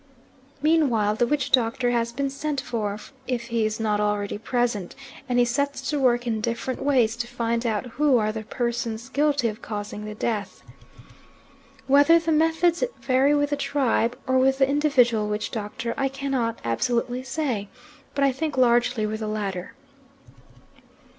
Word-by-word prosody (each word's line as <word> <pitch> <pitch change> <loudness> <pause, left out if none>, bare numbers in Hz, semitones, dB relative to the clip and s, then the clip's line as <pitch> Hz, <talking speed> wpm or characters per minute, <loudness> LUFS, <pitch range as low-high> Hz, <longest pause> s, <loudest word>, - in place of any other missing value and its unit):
Meanwhile 265 -10 +3
the 240 - +2
witch 285 0 -1
doctor 245 0 +2
has 235 -1 0
been 275 +3 -2
sent 290 0 -3
for, 210 -5 -3 0.3
if 240 -1 -3
he 230 -2 +1
is 215 +1 -4
not 210 -2 0
already 205 -1 -1
present, 235 -5 -1 0.3
and 245 - +1
he 245 - +5
sets 280 +4 -1
to 295 - 0
work 245 -2 +2
in 220 -2 -1
different 235 +3 -3
ways 250 -5 +2
to 235 0 -3
find 235 0 -1
out 220 +1 -1
who 270 +2 +2
are 215 -1 +1
the 220 0 -5
persons 235 +1 -3
guilty 285 -3 +1
of 220 +1 -5
causing 210 0 -5
the 210 0 -6
death. 215 -2 -3 1.2
Whether 285 +5 +6
the 330 -1 -1
methods 325 +3 +2 0.2
vary 270 +3 +3
with 290 0 +1
the - - +2
tribe, 255 -4 0
or 260 -1 +2
with 265 +1 +3
the 270 -1 +4
individual 255 -7 +2
witch 210 0 -2
doctor, 225 +1 -4
I 270 - +1
cannot 265 -4 -2
absolutely 240 - -1
say, 260 -7 -3 0.5
but 280 - +1
I 275 - +4
think 295 +2 -3
largely 240 -2 +3
with 215 +1 -3
the 215 - -3
latter. 200 -4 -4
240 Hz, 165 wpm, -24 LUFS, 220-275 Hz, 1.2 s, Whether